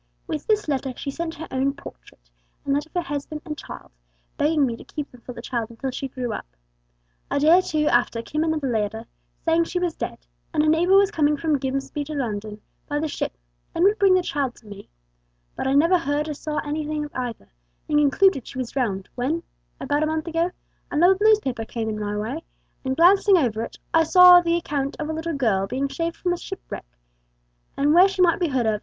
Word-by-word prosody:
With 300 - -5
this 425 -3 +1
letter 270 -2 -1
she 280 - -4
sent 330 +2 -4
her 325 - -7
own 270 +2 0
portrait, - - -14 0.4
and 275 - +1
that 290 +2 -2
of - - -32
her 355 - +1
husband 300 -1 -5
and 305 -2 -4
child, - - -10 0.4
begging 300 -1 +2
me 235 -3 -2
to - - -12
keep 295 -2 -6
them 250 - -16
for 250 - -8
the 235 - -10
child 235 -3 -3
until 245 +3 -5
she 270 +2 -4
grew 250 -3 -4
up. - - -6 0.8
A - - 0
day 310 +4 +6
or - - +2
two 305 -4 -1
after 240 -3 +2
came 305 +5 -1
another 315 -3 -1
letter, 220 -1 -2 0.4
saying 330 0 +3
she 360 - -4
was 355 -2 0
dead, - - -5 0.4
and 300 - +3
a - - +2
neighbour 340 +5 +4
was 400 0 +4
coming 300 -4 +2
from 300 -1 0
Grimsby 275 +2 -3
to 305 +1 -6
London 215 -5 -4 0.3
by 290 0 0
ship, 305 - -4 0.4
and 335 - +2
would 410 +3 +4
bring 390 -2 +5
the 365 - +2
child 275 -6 -2
to 230 - -20
me; 205 -1 -11 0.7
but - - -2
I 265 - +2
never 335 +6 +4
heard 295 0 -1
or 305 - -3
saw 300 +1 -5
anything 300 0 -2
of 295 - -12
either, 240 - -5 0.4
and 295 - +3
concluded 295 0 +3
she - - -9
was 255 -2 -3
drowned, 200 -8 -2
when, 295 +7 -2 0.4
about 290 +2 0
a 310 - +2
month 315 0 -2
ago, 335 +1 0 0.4
an 300 +3 +1
old 380 +2 +5
newspaper 415 - +3
came 225 0 -4
in 215 -1 -3
my 210 0 -3
way, 245 +10 -4 0.4
and 260 0 -2
glancing 385 +3 +6
over 230 -8 0
it, 230 - -6 0.2
I 325 - +6
saw 360 +2 +8
the 340 0 +1
account 280 -4 -2
of 300 - -3
a - - -1
little 320 0 -3
girl 205 -8 +1
being 275 +5 -2
saved 335 0 -2
from 355 -1 -1
a - - -3 0.3
wreck, - - -6 0.9
and 290 +2 +3
where 360 +3 +7
she 390 -2 +1
might 350 +3 +3
be 350 - +1
heard 260 -5 0
of. 215 -1 +1
295 Hz, 225 wpm, -23 LUFS, 255-330 Hz, 0.9 s, saw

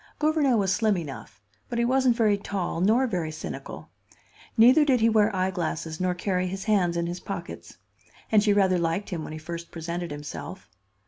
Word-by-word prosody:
Gouvernail 300 -5 +2
was 195 -2 +1
slim 210 0 +2
enough, 135 - -8 0.3
but 240 - -3
he 235 - +2
wasn't 260 -1 +3
very 220 -3 +3
tall 195 -4 -3
nor 225 +7 +3
very 175 -9 -2
cynical; 155 - -8 0.7
neither 250 +7 +7
did 265 -4 +3
he 225 +1 +4
wear 215 -1 +4
eyeglasses 170 -4 -2
nor 180 -1 0
carry 185 0 -1
his 190 +1 -5
hands 190 -6 +1
in 170 - 0
his 175 +1 -4
pockets. - - -7 0.5
And 215 -1 +5
she 210 0 +2
rather 190 -3 +3
liked 170 +5 -2
him 165 -3 -3
when 155 - -7
he - - -6
first 170 +2 -7
presented 170 +1 -5
himself. 145 +6 -8
190 Hz, 185 wpm, -26 LUFS, 170-220 Hz, 0.7 s, neither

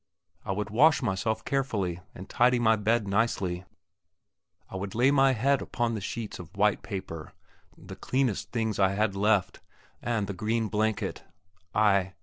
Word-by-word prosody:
I - - -3
would 105 +2 -3
wash 150 +6 +4
myself 110 +1 -1
carefully 105 -11 -1 0.2
and 95 - -9
tidy 125 +1 +3
my 110 -2 +4
bed 110 0 +1
nicely. 95 -4 0 1.0
I - - -10
would 95 +1 -5
lay 125 +4 +4
my 135 -1 +4
head 135 +4 +2
upon 120 -1 -2
the 110 - -3
sheets 110 +1 -5
of 90 +3 -11
white 105 0 +2
paper, 95 -6 -7 0.4
the - - -10
cleanest 130 -6 -1
things 110 -3 -1
I 95 0 +3
had 100 -1 0
left, 100 -1 +1 0.4
and 115 -4 -1
the 100 - -5
green 110 +3 -1
blanket. 110 0 -1 0.5
I 100 -3 +3
110 Hz, 155 wpm, -28 LUFS, 95-120 Hz, 1.0 s, wash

